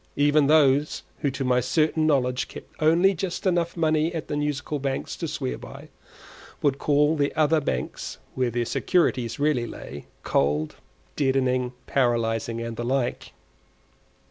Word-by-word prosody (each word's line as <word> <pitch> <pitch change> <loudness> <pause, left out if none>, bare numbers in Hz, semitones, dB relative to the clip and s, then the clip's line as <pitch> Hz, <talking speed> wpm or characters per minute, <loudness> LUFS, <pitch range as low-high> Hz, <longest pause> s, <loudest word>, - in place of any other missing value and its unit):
Even 145 0 +3
those 145 -1 +3 0.2
who 145 - 0
to 135 0 -4
my 125 -1 +3
certain 155 +4 +1
knowledge 125 -4 +1
kept - - -11
only 170 +5 +4
just 180 +1 -4
enough 175 -2 +1
money 160 0 +2
at 160 - -5
the 145 - -1
Musical 145 0 -2
Banks 135 - -3
to - - -4
swear 65 -1 -3
by, - - -11 0.7
would 140 -1 +2
call 150 +1 +3
the 145 -2 +1
other 155 0 +3
banks 65 - -4 0.2
(where 130 -2 0
their 120 0 -1
securities 125 -6 +1
really 145 -5 +1
lay) 70 -8 -9 0.2
cold, 75 +2 0 0.4
deadening, 130 -2 +1
paralysing, 115 -3 0
and 115 -1 -5
the 120 - -3
like. 125 0 -2
140 Hz, 145 wpm, -25 LUFS, 120-155 Hz, 0.7 s, only